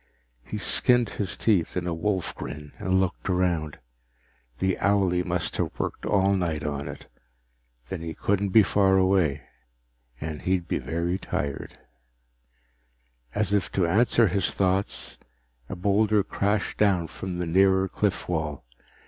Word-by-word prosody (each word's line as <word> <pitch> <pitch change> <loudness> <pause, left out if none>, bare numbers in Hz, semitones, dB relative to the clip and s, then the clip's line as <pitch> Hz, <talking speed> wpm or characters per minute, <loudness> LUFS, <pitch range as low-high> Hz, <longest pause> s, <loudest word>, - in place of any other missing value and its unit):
He - - -6
skinned 120 -3 +3
his 100 -1 -3
teeth 95 -6 +1
in 90 - -2
a 90 - -1
wolf 90 +2 -1
grin 75 -1 -8
and 95 0 +1
looked 95 0 -2
around. 85 -5 0 0.8
The 95 -1 +1
owlie 95 -3 +2
must 90 -1 -2
have - - -2
worked - - -3
all 100 -1 +3
night 85 -6 -1
on 70 -1 -3
it. - - -9 0.8
Then 85 +5 -5
he 80 -1 -5
couldn't 100 0 0
be 110 +3 +6
far 95 -1 +3
away 95 -6 +2 0.8
and 75 -1 -5
he'd 90 -2 0
be - - -1
very 85 +3 -2
tired 70 -5 -4 1.6
As 105 -2 0
if 100 -2 +1
to 95 - +2
answer 115 +6 +4
his 95 +1 0
thoughts, 95 +1 -1 0.5
a - - -4
boulder 100 +3 +2
crashed 100 0 -1
down 95 -5 +3
from 90 +2 -6
the 90 - -2
nearer 95 +2 +3
cliff 100 +1 -1
wall. 75 -6 -3
95 Hz, 145 wpm, -26 LUFS, 85-100 Hz, 1.6 s, be